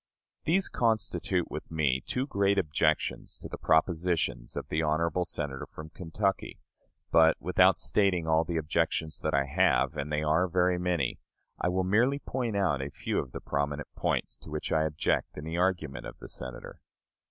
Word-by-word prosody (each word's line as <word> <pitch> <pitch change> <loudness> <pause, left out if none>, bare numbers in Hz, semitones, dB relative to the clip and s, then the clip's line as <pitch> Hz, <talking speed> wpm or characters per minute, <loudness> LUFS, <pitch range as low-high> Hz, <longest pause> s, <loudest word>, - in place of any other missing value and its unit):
These 190 +5 +2
constitute 115 -2 0
with - - -6
me 75 -5 +1
two 130 +1 -2
great 100 -6 +1
objections 80 -1 0
to - - -9
the - - -7
propositions 80 -5 +1
of - - -4
the 80 - 0
honorable 80 +3 +1
Senator 70 -5 -3
from 80 0 -10
Kentucky; 95 +3 -2 0.5
but, 80 0 +6
without - - +4
stating 95 -5 +2
all 80 0 +3
the 85 0 -3
objections 80 0 -1
that 80 -2 0
I 70 0 +2
have, 70 - +2
and 75 +2 -4
they 75 0 0
are 80 +4 +3
very 90 0 +2
many, 90 -8 0 0.4
I - - 0
will 95 +1 +1
merely 115 +9 +3
point 125 -6 -3
out 85 -9 +1
a 70 - -4
few - - -2
of 65 - -5
the - - -7
prominent 70 0 -2
points - - -1
to - - -12
which 75 0 -4
I 80 0 +3
object 75 -1 -1
in 75 - -6
the 80 +2 -4
argument 90 -6 -1
of - - -10
the - - -11
Senator. 65 0 -8
80 Hz, 175 wpm, -29 LUFS, 75-95 Hz, 0.5 s, but